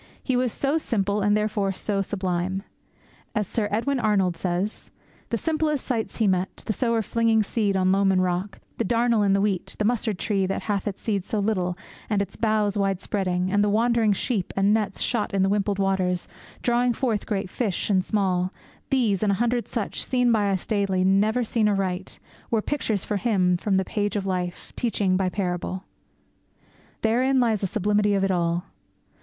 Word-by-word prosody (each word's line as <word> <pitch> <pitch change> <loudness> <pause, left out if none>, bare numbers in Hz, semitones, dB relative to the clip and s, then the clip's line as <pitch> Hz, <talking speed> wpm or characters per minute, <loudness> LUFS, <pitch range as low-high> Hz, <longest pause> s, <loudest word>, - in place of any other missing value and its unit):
He 260 - 0
was 250 -1 +1
so 280 +8 0
simple 205 -6 0
and 205 +1 +3
therefore 210 -2 0
so 195 +1 -1
sublime. 190 -1 -2 0.7
As 210 -1 +1
Sir 210 +2 -1
Edwin 255 +6 0
Arnold 200 -6 +2
says: 180 +4 -3 0.4
The 230 - 0
simplest 305 +1 -1
sights 230 -4 -2
He 225 - +2
met 185 0 -1
The 215 - 0
Sower 230 -1 +1
flinging 225 +1 +2
seed 205 -2 0
on 185 0 +3
loam 195 0 +3
and 185 -1 +3
rock; 180 +2 -2 0.2
The - - +2
darnel 235 +1 +2
in 200 -1 +3
the 195 - +3
wheat; 200 -3 -1
the 210 - 0
mustard 220 -3 0
tree 195 -1 0
That 195 - -2
hath 205 -2 -1
its 200 - -5
seeds 200 -4 -1
so 220 - -2
little, 185 -4 0 0.3
and 210 -2 +1
its 200 -1 -3
boughs 215 -2 +1
Widespreading; 190 -1 0
and 205 +1 +3
the 205 - +2
wandering 225 0 +3
sheep; 200 -1 -1
and 195 +2 +4
nets 210 -3 -1
Shot 215 -4 0
in 190 - +3
the 195 - +2
wimpled 200 0 0
waters 190 -2 0 0.4
drawing 245 0 +2
forth 230 -4 -1
Great 200 -2 -1
fish 200 0 -2
and 190 -2 +3
small 185 -3 0 0.4
these, 230 -8 +2
and 210 -2 +2
a - - +1
hundred 240 +2 0
such, 225 -5 -3
Seen 250 -2 +2
by 210 -3 +2
us 190 -2 -1
daily, 200 -4 +1
never 210 +6 +3
seen 220 -1 +1
aright, 190 -2 -2 0.3
Were 220 -2 +1
pictures 225 -9 -1
for 210 - -1
Him 185 -4 +2
from 195 +3 0
the 190 0 +2
page 205 +1 -2
of 200 -2 -1
life, 180 -2 -3
Teaching 205 -5 +1
by 185 0 +1
parable. 185 0 -3 1.2
Therein 255 +4 +3
lay 235 -3 +3
the 200 -2 -2
sublimity 205 +1 +1
of 195 - +1
it 195 - +2
all. 170 -1 0
205 Hz, 190 wpm, -25 LUFS, 190-225 Hz, 1.2 s, and